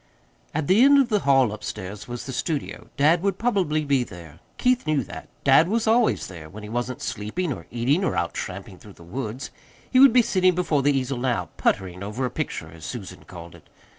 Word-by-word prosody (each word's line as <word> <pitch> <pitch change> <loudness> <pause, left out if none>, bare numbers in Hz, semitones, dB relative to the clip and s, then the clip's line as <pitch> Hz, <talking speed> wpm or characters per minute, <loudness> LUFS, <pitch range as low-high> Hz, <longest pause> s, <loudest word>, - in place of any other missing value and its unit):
At 155 -1 0
the 190 +9 +4
end 280 +1 +7
of 270 -3 +3
the 210 -2 +2
hall 135 - +3
upstairs 105 -1 -7
was 120 0 -6
the 130 - -6
studio. 145 +3 -3
Dad 155 +5 +4
would 195 -1 0
probably 185 -10 0
be 140 -3 +2
there. 85 -7 -12 0.2
Keith 250 -7 +1
knew 150 -4 +1
that. - - -10
Dad 165 - +6
was 225 +3 0
always 225 +1 +2
there, 80 -4 -10
when 105 +5 -10
he 105 - -8
wasn't 120 +2 -3
sleeping 125 - -3
or - - -11
eating, 130 +10 +1
or - - 0
out 85 0 -1
tramping 95 0 -6
through 105 - -14
the 85 - -14
woods. 115 +6 -5 0.4
He 255 - +4
would 270 -1 +9
be 245 0 +5
sitting 185 -5 +2
before 165 -5 +1
the 140 - +2
easel 130 -1 -2
now 125 -1 -1
"puttering" 90 -1 -1
over 105 +6 -3
a 125 - -3
picture, - - -4
as 80 -1 -13
Susan 95 -5 -7
called 85 -2 -11
it. - - -18
130 Hz, 215 wpm, -24 LUFS, -, 0.4 s, would